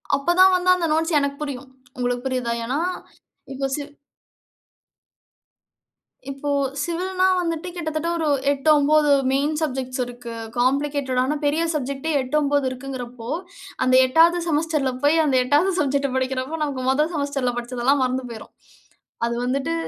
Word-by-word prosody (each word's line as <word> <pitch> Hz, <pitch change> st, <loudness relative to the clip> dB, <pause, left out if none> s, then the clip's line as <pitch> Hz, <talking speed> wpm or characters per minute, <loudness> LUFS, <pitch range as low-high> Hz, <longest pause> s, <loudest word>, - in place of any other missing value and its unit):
அப்போ 280 Hz, +5 st, 0 dB
தான் 375 Hz, 0 st, +7 dB
வந்து 365 Hz, 0 st, +1 dB
அந்த 345 Hz, -2 st, -1 dB
நோட்ஸ் 320 Hz, 0 st, +1 dB
எனக்கு 280 Hz, 0 st, -2 dB
புரியும். 275 Hz, -2 st, -6 dB, 0.3 s
உங்களுக்கு 245 Hz, +1 st, -2 dB
புரியிதா? 250 Hz, -3 st, -1 dB
ஏனா 270 Hz, +5 st, -1 dB, 0.7 s
இப்போ 270 Hz, 0 st, -2 dB
சிவ் 290 Hz, -1 st, -7 dB, 2.4 s
இப்போ 275 Hz, +1 st, -5 dB, 0.3 s
சிவில்னா, 370 Hz, +2 st, -1 dB, 0.2 s
வந்துட்டு 335 Hz, +1 st, -3 dB
கிட்டத்தட்ட 315 Hz, -1 st, -3 dB
ஒரு 315 Hz, -2 st, 0 dB, 0.2 s
8 285 Hz, +2 st, 0 dB
9 295 Hz, +1 st, +3 dB, 0.2 s
மெயின் 285 Hz, +3 st, +1 dB
சப்ஜெக்ட்ஸ் 260 Hz, -3 st, -2 dB
இருக்கு. 240 Hz, -1 st, -9 dB, 0.2 s
காம்ப்ளிகேட்டடான 270 Hz, +1 st, 0 dB
பெரிய 310 Hz, +3 st, +1 dB
சப்ஜெக்ட்டே 280 Hz, +2 st, -3 dB
8, 255 Hz, +4 st, -4 dB
9 285 Hz, -1 st, +1 dB
இருக்குங்கிறப்போ, 250 Hz, -2 st, -7 dB, 0.5 s
அந் 255 Hz, 0 st, +3 dB
8வது 330 Hz, +6 st, +4 dB
செமஸ்டர்ல 300 Hz, -3 st, 0 dB
போய் 300 Hz, +3 st, +4 dB
அந்த 270 Hz, -3 st, +1 dB
8வது 295 Hz, +9 st, +2 dB
சப்ஜெக்ட்ட 280 Hz, -1 st, +1 dB
படிக்கிறப்போ 260 Hz, +4 st, -2 dB
நமக்கு 270 Hz, -3 st, -3 dB
மொத 300 Hz, +4 st, +2 dB
செமஸ்டர்ல 280 Hz, -4 st, -1 dB
படிச்சதெல்லாம் 250 Hz, +3 st, 0 dB
மறந்து 255 Hz, 0 st, -1 dB
போயிரும். 220 Hz, -, -10 dB, 0.7 s
அது 235 Hz, -, -2 dB
வந்துட்டு 275 Hz, +5 st, -1 dB
280 Hz, 135 wpm, -22 LUFS, 255-310 Hz, 2.4 s, தான்